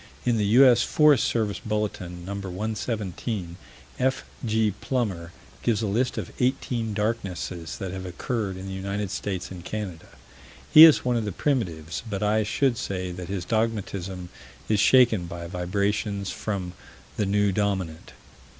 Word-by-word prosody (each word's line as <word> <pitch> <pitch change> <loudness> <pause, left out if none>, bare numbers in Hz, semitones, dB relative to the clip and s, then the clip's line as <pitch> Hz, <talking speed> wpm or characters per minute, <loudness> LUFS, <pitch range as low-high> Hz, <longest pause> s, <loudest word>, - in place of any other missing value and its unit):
In 120 -2 +2
the 105 - +1
U.S. 125 -3 +7
Forest 150 -5 +4
Service 110 -3 -1
Bulletin, 105 -6 -3
No. 100 - -4
117, 100 -1 -4 0.4
F.G. 110 -4 0
Plummer 95 -10 -2 0.3
gives 115 -2 +1
a - - 0
list 120 +6 0
of - - -4
eighteen 120 -3 0
darknesses 95 -6 -3
that 95 -3 -5
have 95 0 -5
occurred 100 +1 -3
in 95 - -7
the 95 - -5
United 100 +1 -3
States 95 -3 -4
and 90 -2 -8
Canada. 95 -5 -5 0.6
He 155 +1 +12
is 160 -5 +5
one 125 -1 +2
of 115 - -1
the 105 - -2
primitives, 85 - -2
but 100 0 -2
I 105 +1 +3
should 120 +3 +1
say 90 -2 -3
that 90 0 -7
his 95 -3 -3
dogmatism 100 -5 -2 0.4
is 105 -2 +2
shaken 115 -6 +5
by 85 0 -6
vibrations 100 +3 -1
from 95 -4 -4 0.4
the 105 - 0
new 100 0 +2
Dominant. 95 -5 -2
100 Hz, 150 wpm, -26 LUFS, 90-115 Hz, 0.6 s, He